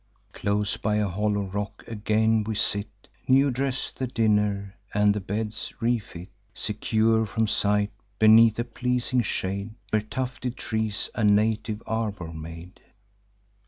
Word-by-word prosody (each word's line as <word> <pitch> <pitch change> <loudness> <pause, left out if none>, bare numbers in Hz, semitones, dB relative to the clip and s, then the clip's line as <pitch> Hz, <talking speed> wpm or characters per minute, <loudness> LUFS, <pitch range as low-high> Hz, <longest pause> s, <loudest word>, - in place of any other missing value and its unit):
Close 105 0 -1
by 105 0 0
a 105 -1 +1
hollow 100 +2 0
rock, 105 +2 -5
again 110 0 +1
we 110 +1 -3
sit, 100 0 -1 0.2
New 135 +1 +5
dress 135 +1 -1
the 130 - -4
dinner, 105 -4 +1 0.2
and 105 0 +4
the 105 - -2
beds 105 +3 -4
refit, 110 -6 -2 0.3
Secure 110 +1 +1
from 110 +2 0
sight, 105 0 +1 0.3
beneath 110 +1 +7
a 120 - 0
pleasing 125 +1 0
shade, 100 0 -3 0.2
Where 110 - +3
tufted 125 +3 -4
trees 110 -2 -2
a 115 - -2
native 105 +1 +2
arbour 105 -7 -3
made. 80 +3 -9
105 Hz, 130 wpm, -26 LUFS, 100-115 Hz, 0.3 s, beneath